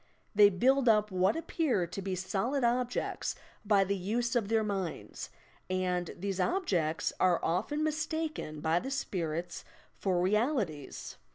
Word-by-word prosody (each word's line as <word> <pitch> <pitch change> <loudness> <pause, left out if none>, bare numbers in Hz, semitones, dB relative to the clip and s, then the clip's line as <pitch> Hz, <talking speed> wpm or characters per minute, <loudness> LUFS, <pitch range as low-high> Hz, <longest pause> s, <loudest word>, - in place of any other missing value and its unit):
They 205 -1 +8
build 255 +7 +3
up 210 -1 +3
what 185 +2 +2
appear 315 - 0
to 180 +4 -6
be 190 -1 -2
solid 205 +9 -1
objects 245 +1 0 0.3
by 205 -2 +4
the 200 +1 0
use 235 +6 -1
of 230 -4 +1
their 225 0 +2
minds, 195 -5 -4 0.4
and 180 -2 0
these 195 +1 -3
objects 180 - 0
are 180 -2 +4
often 290 - 0
mistaken 310 - -2
by 160 +2 +2
the 265 - -5
spirits 175 - -3 0.4
for 185 -3 +1
realities. 200 - -1
200 Hz, 135 wpm, -31 LUFS, 180-245 Hz, 0.4 s, They